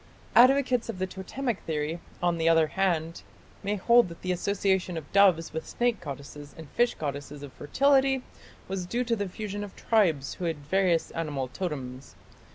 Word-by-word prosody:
Advocates 255 -1 +5
of 220 - -4
the 185 - -1
Totemic 200 +6 -4
theory, 155 +1 -3 0.2
on 175 -1 +1
the 165 0 +3
other 165 -1 +5
hand, 170 -2 -1 0.4
may 205 +1 -1
hold 235 +1 +4
that 170 - -12
the 185 - -1
association 190 -1 0
of 155 -3 -8
doves 185 -6 +4
with 160 - -4
snake 240 -3 0
goddesses 140 +1 -8
and 160 -2 -9
fish 240 0 +2
goddesses 145 -1 -5
of 140 - -9
fertility 270 - +2 0.4
was 185 -2 -4
due 240 +6 -1
to 235 -1 0
the 205 -3 -3
fusion 205 +1 -5
of 205 - -9
tribes 170 -12 +1
who 180 - -5
had 165 -2 -1
various 170 +3 +1
animal 145 -5 -3
totems. 135 -6 -6
180 Hz, 170 wpm, -28 LUFS, 155-210 Hz, 0.4 s, Advocates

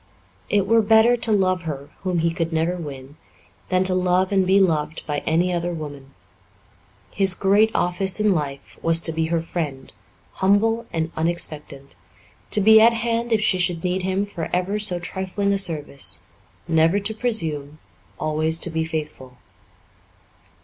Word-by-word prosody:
It 205 -2 +2
were 225 +2 +4
better 220 +3 +4
to 230 -1 -4
love 185 -3 +1
her, 145 -4 -7
whom 185 -2 -2
he 170 - +2
could 165 0 -3
never 165 +2 0
win, 145 -4 -9 0.5
than 185 0 +2
to 185 0 +1
love 185 +1 +1
and 190 -2 +2
be 195 +1 +4
loved 160 -4 0
by 145 -1 -2
any 175 +3 +1
other 175 0 -2
woman. 145 -3 -9 1.0
His 195 -1 +2
great 200 +3 +3
office 180 +3 0
in 210 -2 +3
life 140 -4 -5
was 165 0 +4
to 165 - +3
be 160 0 -1
her 165 0 -1
friend, 150 -6 -5 0.5
humble 225 +4 +2
and 160 0 -2
unexpectant; 155 -4 -3 0.5
to 210 - +4
be 220 +2 +7
at 230 +1 +6
hand 230 +1 -2
if 220 -2 +2
she 205 -4 +2
should 175 -2 0
need 180 +1 -1
him 190 +2 -1
for 175 -5 -6
ever 185 +4 -1
so 205 -4 +1
trifling 190 +3 -2
a 200 - +1
service; 150 -7 -2 0.4
never 165 +3 +3
to 205 +2 -3
presume, 160 -11 -2 0.4
always 155 +1 0
to 170 - 0
be 160 0 -1
faithful. 150 -5 -6
180 Hz, 165 wpm, -22 LUFS, 160-200 Hz, 1.0 s, be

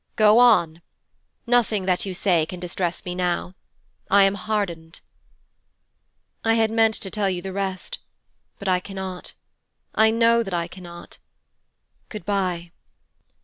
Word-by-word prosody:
'Go 215 +1 +6
on. 175 -9 +4 0.6
Nothing 230 -5 +2
that 185 +1 0
you 185 - -4
say 175 -4 +2
can 180 - -7
distress 175 0 -3
me 180 - -3
now. 180 0 -1 0.6
I 200 +1 +6
am 195 0 +3
hardened.' 195 -6 -3 1.4
'I 225 0 +3
had 225 -1 +2
meant 225 -1 +3
to 190 - -6
tell 205 -2 0
you 180 -2 -3
the 190 -1 -5
rest, 190 -1 -4 0.6
but 200 - -7
I 185 -1 +3
cannot: 190 -1 -7 0.6
I 220 0 +5
know 230 +1 +4
that 195 -5 -3
I 170 -1 -1
cannot: 175 -1 -11 0.9
good 210 -6 -8
bye.' 180 -4 -1
190 Hz, 140 wpm, -23 LUFS, 180-215 Hz, 1.4 s, Go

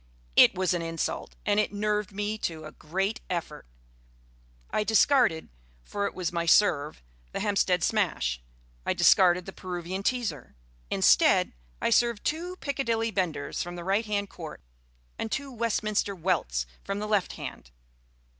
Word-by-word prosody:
It - - +7
was 185 0 +1
an 175 - -1
insult, 165 -1 -3
and 205 0 +3
it 215 - +1
nerved 210 0 -1
me 205 +2 -2
to 160 -4 -4
a 155 - -8
great 195 +9 -2
effort. 165 - -4 1.0
I 215 - +1
discarded 220 - +3 0.3
for 200 - -2
it - - -7
was 180 -2 -2
my 170 -1 -2
serve 155 - +3 0.3
the - - -2
Hampstead 195 -4 +1
Smash; 160 - 0 0.4
I - - 0
discarded 180 -1 +5
the 195 - -8
Peruvian 180 +1 -5
Teaser. 205 - -2 0.3
Instead, - - +4 0.3
I - - 0
served 235 -1 +3
two 345 +4 -2
Piccadilly 235 -8 -1
Benders 170 -8 -2
from 175 0 -5
the 175 - -6
right 200 +5 0
hand 200 -1 -2
court 160 - -9 0.6
and 225 - -3
two 275 0 -3
Westminster 215 -4 -1
Welts 160 - 0 0.2
from 195 - -3
the 210 +1 -3
left 210 -3 +1
hand. - - -8
195 Hz, 150 wpm, -28 LUFS, 170-215 Hz, 1.0 s, It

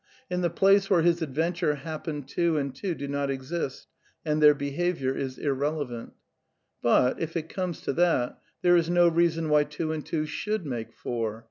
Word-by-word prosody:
In 180 0 0
the 175 - +2
place 195 +3 +4
where 175 -4 +4
x>^ - - +1
his 170 0 +3
adventures 160 +1 0
happen 155 -1 -5
two 165 +4 0
and 140 -2 -2
two 180 +4 -3
do 140 - -5
not 140 0 -1
exist, 135 +1 -4 0.4
and 155 0 +1
their 150 -1 +8
qf^ - - -13
behaviour 140 -1 -1
is 130 -2 -4
irrelevant. 140 -4 -2 0.7
But, 125 +1 +3
if 165 +1 -3
it 160 0 -4
comes 180 -4 -3
to - - -2
that, 165 -6 +1 0.2
there 175 0 +6
is 170 -1 +2
no 175 0 +5
reason 165 -1 +2
why 150 -1 +4
two 150 +2 -3
and 155 -2 -3
two 155 -1 -2
should 210 +4 -3
make 120 -5 -4
four. 115 -2 -3
155 Hz, 195 wpm, -27 LUFS, 140-170 Hz, 0.7 s, their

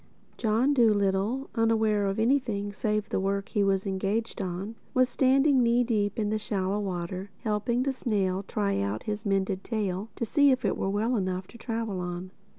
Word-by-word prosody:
John 235 +5 +2
Dolittle, 215 +1 +2
unaware 220 -3 +2
of 195 - -1
anything 220 -5 +1
save 215 +1 -1
the - - 0
work 195 +1 -1
he 205 - +1
was 195 0 +1
engaged 200 +4 -2
on, 190 +3 -4 0.2
was 255 0 +4
standing 270 +2 +4
knee 240 +1 +3
deep 210 -3 0
in 210 -2 0
the 215 - 0
shallow 200 -1 -1
water, 185 0 -4
helping 225 +3 0
the 275 0 0
snail 195 -7 0
try 200 0 -1
out 100 +2 -2
his 210 0 -4
mended 195 -1 0
tail 205 -2 -2
to 235 - -2
see 285 +5 +4
if 255 -3 +1
it - - +1
were 195 - -1
well 220 +5 0
enough 185 -3 -1
to 235 - -13
travel 225 -5 -3
on. 180 +1 -5
210 Hz, 180 wpm, -28 LUFS, 195-230 Hz, 0.2 s, was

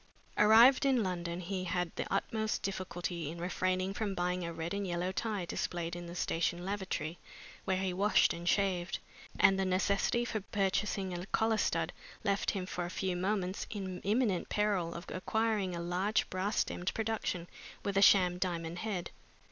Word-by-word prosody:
Arrived 225 +5 +7
in 265 -4 +3
London, 175 -2 -3
he 185 +1 -3
had 180 -1 -1
the - - -4
utmost 220 +2 -1
difficulty 175 -4 -3
to - - -9
refrain 185 +2 0
from 205 -2 -2
buying 180 0 -1
a 170 - -3
red 165 +2 -4
and 200 -1 -2
yellow 175 +1 -1
tie 205 -2 -2
displayed 170 0 -3
in 175 0 -7
the 170 - -7
station 175 +1 -1
lavatory 190 -5 -3 0.5
where 190 -1 +1
he 190 -1 -1
washed 200 +3 +4
and 170 +1 -2
shaved, 190 -3 +1 0.4
and 195 0 +6
the - - +2
necessity 195 +5 +1
for 220 -3 -2
purchasing 195 -1 -1
a 175 0 -4
collar 220 +1 +2
stud - - 0 0.3
left 200 -2 +1
him 190 -3 -2
for 180 -1 -3
a - - -4
few 185 0 -2
moments 190 0 -1
in 190 -3 -5
imminent 210 -3 +1
peril 200 -5 0
of 170 - -6
acquiring 210 -1 0
a - - -4
large 180 +5 0
brass 190 +3 -1
stemmed 180 +1 0
production 215 -6 -2 0.4
with 200 -1 -2
a 195 - +4
sham 180 -3 +6
diamond 170 -2 -2
head. 200 -5 -3
185 Hz, 170 wpm, -33 LUFS, 175-205 Hz, 0.5 s, Arrived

